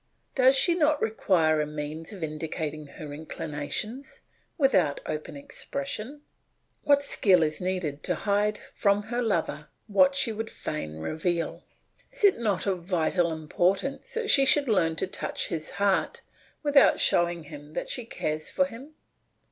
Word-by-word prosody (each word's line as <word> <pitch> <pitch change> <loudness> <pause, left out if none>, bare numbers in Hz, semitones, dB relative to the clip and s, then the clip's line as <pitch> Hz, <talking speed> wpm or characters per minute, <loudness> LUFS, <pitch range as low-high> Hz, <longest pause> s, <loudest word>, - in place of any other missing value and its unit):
Does 260 0 +5
she 340 +6 +4
not 305 -3 +2
require 170 -8 +2
a 150 - -2
means 150 +3 -5
of 195 -5 -7
indicating 155 -1 -4
her 145 +1 -9
inclinations 160 - -5 0.4
without 190 - +3
open 150 -1 -5
expression? 275 - -5 0.6
What 285 0 +4
skill 190 -10 +4
is 155 +2 -2
needed 180 -6 -2
to 180 - +1
hide 210 +3 +1 0.2
from 200 0 +2
her 240 +3 -2
lover 170 -8 -1 0.2
what 275 +6 +4
she 265 -4 +1
would 220 +1 -4
fain 80 - -5
reveal! 165 - -2 0.5
Is - - -4
it 400 -9 +5
not 205 -5 0
of 185 -4 -1
vital 175 -1 +1
importance 180 - -1
that 455 -2 0
she 275 - +6
should 280 +1 +3
learn 170 -7 +2
to - - 0
touch 185 - -3
his 160 -3 -3
heart 200 0 0 0.4
without 290 -2 +5
showing 160 -4 0
that - - -3
she 245 - -3
cares 155 -8 -3
for 275 - +2
him? 275 +4 -11
185 Hz, 150 wpm, -27 LUFS, 155-245 Hz, 0.6 s, she